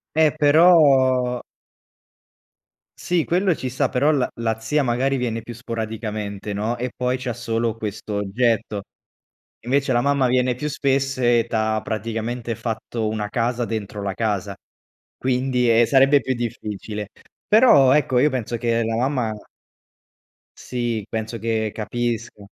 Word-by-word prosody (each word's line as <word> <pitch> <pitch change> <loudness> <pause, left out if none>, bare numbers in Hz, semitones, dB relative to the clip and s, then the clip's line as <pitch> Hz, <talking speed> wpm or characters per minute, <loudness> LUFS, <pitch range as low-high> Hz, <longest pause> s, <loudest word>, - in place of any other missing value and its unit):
Eh, 155 -2 +4
però 140 -6 +4 1.6
Sì 175 -3 0
quello 185 0 +1
ci 130 - -4
sta, 125 - 0
però 140 +4 +2
la 135 -4 +1
la 110 -1 -2
zia 145 +7 0
magari 130 +2 0
viene 115 -2 -2
più 120 +1 -9
sporadicamente, 110 -3 -5
no, 110 +4 -2
e 125 +1 -3
poi 125 +1 -1
c'ha 125 -1 -4
solo 115 -1 -2
questo 105 -1 -6
oggetto. 105 0 0 0.8
Invece 135 +2 +1
la 120 - +3
mamma 140 0 +2
viene 125 0 +1
più 150 +5 -3
spesso 135 -2 0
e 120 -1 +3
t'ha 110 -1 0
praticamente 115 +2 -3
fatto 110 0 -3
una 105 -1 -3
casa 120 +2 -1
dentro 105 -2 -5
la 100 -1 -2
casa, 100 -2 -2 0.6
quindi, 125 -1 +1
ehm, 115 +1 +5
sarebbe 135 +3 +5
più 130 - -2
difficile. 105 -3 -5 0.4
Però 205 - +6
ecco, 130 -3 +2
io 145 - +4
penso 120 -4 -3
che 115 0 0
la 115 0 -1
mamma 125 -3 0 1.3
Sì, 120 -4 -3
penso 110 +1 -4
che 110 -1 -1
capisca. 115 -1 -4
120 Hz, 140 wpm, -22 LUFS, 110-130 Hz, 1.6 s, Però